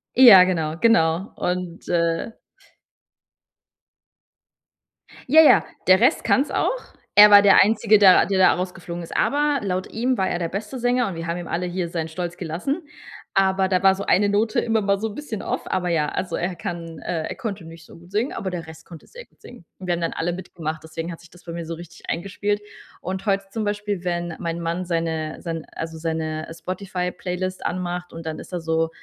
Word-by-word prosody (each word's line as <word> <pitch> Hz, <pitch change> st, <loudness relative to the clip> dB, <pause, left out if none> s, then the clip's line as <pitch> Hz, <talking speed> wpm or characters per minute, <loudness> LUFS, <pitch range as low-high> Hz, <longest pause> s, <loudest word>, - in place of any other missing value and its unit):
ja, 230 Hz, -8 st, +10 dB
genau, 165 Hz, -3 st, -1 dB
genau. 180 Hz, -3 st, +2 dB
Und 180 Hz, -1 st, -4 dB
äh 170 Hz, +4 st, 0 dB, 3.0 s
Ja, 320 Hz, +1 st, +9 dB
ja, -, -, +6 dB, 0.2 s
der 185 Hz, +1 st, +6 dB
Rest 245 Hz, -, +3 dB
kann's 275 Hz, +2 st, +2 dB
auch. -, -, 0 dB, 0.4 s
Er 210 Hz, 0 st, +9 dB
war 205 Hz, 0 st, +8 dB
der 195 Hz, -, +7 dB
Einzige, 215 Hz, 0 st, +4 dB
der 190 Hz, -3 st, +7 dB
der 195 Hz, -1 st, 0 dB
da 185 Hz, -, +6 dB
rausgeflogen 175 Hz, -1 st, -5 dB
ist. -, -, -9 dB
Aber 290 Hz, 0 st, +1 dB
laut 185 Hz, -2 st, -2 dB
ihm 250 Hz, +3 st, 0 dB
war 190 Hz, -, +1 dB
er 175 Hz, -, -2 dB
der 165 Hz, -1 st, -2 dB
beste 210 Hz, +6 st, -5 dB
Sänger 245 Hz, -1 st, +1 dB
und 190 Hz, -, -4 dB
wir 165 Hz, 0 st, -6 dB
haben 170 Hz, +1 st, -2 dB
ihm 175 Hz, -, -7 dB
alle 180 Hz, +1 st, -2 dB
hier 175 Hz, -1 st, -3 dB
seinen 165 Hz, -1 st, -3 dB
Stolz 175 Hz, +1 st, -5 dB
gelassen. 185 Hz, -, -3 dB, 0.5 s
Aber 190 Hz, 0 st, +3 dB
da 185 Hz, 0 st, 0 dB
war 190 Hz, 0 st, +6 dB
so 200 Hz, +1 st, -5 dB
eine 205 Hz, +3 st, +4 dB
Note 210 Hz, +2 st, +1 dB
immer 225 Hz, -1 st, +1 dB
mal 200 Hz, 0 st, +1 dB
so 220 Hz, +1 st, -2 dB
'n -, -, -9 dB
bisschen 235 Hz, -6 st, -6 dB
off. -, -, -2 dB
Aber 180 Hz, -1 st, -1 dB
ja, 155 Hz, -3 st, +1 dB
also 180 Hz, -3 st, -3 dB
er 180 Hz, +1 st, -2 dB
kann, 170 Hz, -4 st, -6 dB
äh 160 Hz, -2 st, -2 dB
er -, -, -6 dB
konnte 200 Hz, -7 st, -5 dB
nicht 165 Hz, 0 st, -12 dB
so -, -, -15 dB
gut 175 Hz, +2 st, -17 dB
singen, 240 Hz, -, -1 dB
aber 190 Hz, -, -4 dB
der 175 Hz, -3 st, -5 dB
Rest 160 Hz, 0 st, -13 dB
konnte 165 Hz, -3 st, -12 dB
sehr -, -, -12 dB
gut -, -, -36 dB
singen. 240 Hz, -9 st, -14 dB
Und 185 Hz, -, -9 dB
wir 175 Hz, -, 0 dB
haben 170 Hz, -, -3 dB
dann 165 Hz, -, -1 dB
alle 175 Hz, +1 st, -2 dB
mitgemacht, 160 Hz, -4 st, -6 dB
deswegen 165 Hz, +2 st, -6 dB
hat 165 Hz, -, -9 dB
sich 175 Hz, -, -17 dB
das 175 Hz, -, -19 dB
bei 170 Hz, -, -7 dB
mir 170 Hz, -1 st, -5 dB
so 165 Hz, -, -4 dB
richtig 170 Hz, 0 st, -12 dB
eingespielt. 205 Hz, +3 st, -2 dB, 0.4 s
Und 190 Hz, +3 st, -5 dB
heute 195 Hz, 0 st, +1 dB
zum 220 Hz, 0 st, -3 dB
Beispiel, 205 Hz, -2 st, -3 dB
wenn 175 Hz, -1 st, -2 dB
mein 170 Hz, 0 st, -3 dB
Mann 170 Hz, +2 st, -2 dB
seine 165 Hz, -2 st, -2 dB
sein 165 Hz, -2 st, -4 dB
also 160 Hz, 0 st, -6 dB
seine 160 Hz, -1 st, -3 dB
Spotify-Playlist 185 Hz, +1 st, -4 dB
anmacht 180 Hz, 0 st, -4 dB
und 165 Hz, 0 st, -9 dB
dann 160 Hz, -1 st, -4 dB
ist -, -, -11 dB
da 175 Hz, -, -3 dB
so 165 Hz, 0 st, 0 dB
180 Hz, 210 wpm, -23 LUFS, 165-200 Hz, 3.0 s, ja